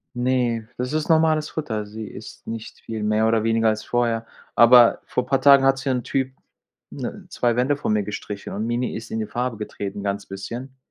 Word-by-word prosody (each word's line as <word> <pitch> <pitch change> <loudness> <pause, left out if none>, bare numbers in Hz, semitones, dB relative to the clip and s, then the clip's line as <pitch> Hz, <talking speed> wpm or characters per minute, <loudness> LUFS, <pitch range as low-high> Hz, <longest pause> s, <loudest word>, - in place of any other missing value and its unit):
Ne, 120 -3 0
das 125 +2 -2
ist 155 0 -1
normales 160 -2 +3
Futter. 110 -9 -3
Sie 110 +2 -8
isst - - -11
nicht 115 -1 -7
viel 110 -2 -5
mehr 110 +1 +2
oder 110 -1 +2
weniger 115 0 +2
als 110 0 -2
vorher. 115 -2 0 0.3
Aber 120 0 +7
vor 125 - -2
paar 135 0 +1
Tagen 140 0 +7
hat 135 0 +3
hier 135 -1 -1
'n 125 -2 -2
Typ, 130 -1 -1 0.6
ne, - - -6
2 120 -1 +1
Wände 135 +3 +1
von 110 - -1
mir 105 -1 +1
gestrichen 105 0 -6
und 110 +2 -2
Mini 120 +1 -1
ist 115 +1 -7
in 110 - -2
die 110 - -2
Farbe 125 -2 -2
getreten, 100 -1 -5
ganz 100 0 -2
bisschen. 120 +7 -7
115 Hz, 205 wpm, -23 LUFS, 110-130 Hz, 0.6 s, Aber